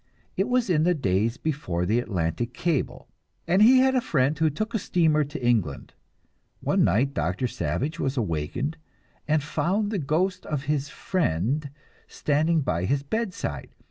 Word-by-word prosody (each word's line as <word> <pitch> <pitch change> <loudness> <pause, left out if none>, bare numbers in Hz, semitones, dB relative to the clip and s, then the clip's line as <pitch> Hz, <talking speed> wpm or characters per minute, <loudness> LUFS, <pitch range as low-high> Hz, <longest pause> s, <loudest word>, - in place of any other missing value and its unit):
It 195 - +1
was 250 -1 +2
in 165 -5 +2
the 175 +2 +3
days 115 - 0
before 110 - -2
the 110 +6 +2
Atlantic 110 +1 -2
cable, 165 -6 -1 0.4
and 185 +4 +3
he 245 +5 +8
had 260 +1 +4
a 255 - +2
friend 140 - +1
who 160 0 +2
took 215 - -4
a 225 - +1
steamer 160 -5 +2
to 145 -3 -6
England. 105 - 0 0.7
One - - +2
night 125 +10 +2
Doctor 135 - -1
Savage 90 - -2
was 135 +1 -1
awakened 110 - -2 0.5
and 155 -1 +2
found 200 +7 0
the 205 - -1
ghost 180 +6 0
of 145 -3 -2
his 145 -1 -1
friend 140 - -1 0.4
standing 155 +2 +1
by 90 - -1
his 140 +5 0
bedside. 180 - -4
145 Hz, 160 wpm, -25 LUFS, 120-175 Hz, 0.7 s, he